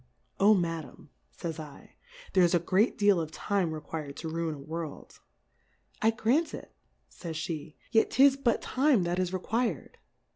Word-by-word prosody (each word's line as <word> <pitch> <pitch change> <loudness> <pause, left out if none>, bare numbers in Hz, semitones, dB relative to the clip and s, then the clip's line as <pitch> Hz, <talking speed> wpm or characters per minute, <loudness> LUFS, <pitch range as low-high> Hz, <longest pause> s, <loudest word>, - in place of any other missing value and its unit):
Oh, 210 +2 +6
Madam, 165 -4 -4 0.2
fays 160 - -6
7, 150 -3 -10 0.4
there 185 - +5
is 175 0 +4
a - - +4
great 190 +7 +2
deal 205 -4 +4
of 160 - -4
Time 185 +1 -1
requir'd 155 -2 -6
to 160 - -5
ruin 165 -1 -2
a - - -11
World. 160 +1 -7 0.8
I 220 - +5
grant 245 +8 +1
it, - - -11 0.3
fays 165 -3 -8
Jhe^ 155 -1 -5 0.2
yet 225 - +4
'tis 270 0 +5
but 260 -4 0
Time, 260 -6 +2
that 175 +1 -1
is 185 -1 0
requir'd. 225 +6 -2
175 Hz, 160 wpm, -29 LUFS, 160-220 Hz, 0.8 s, Oh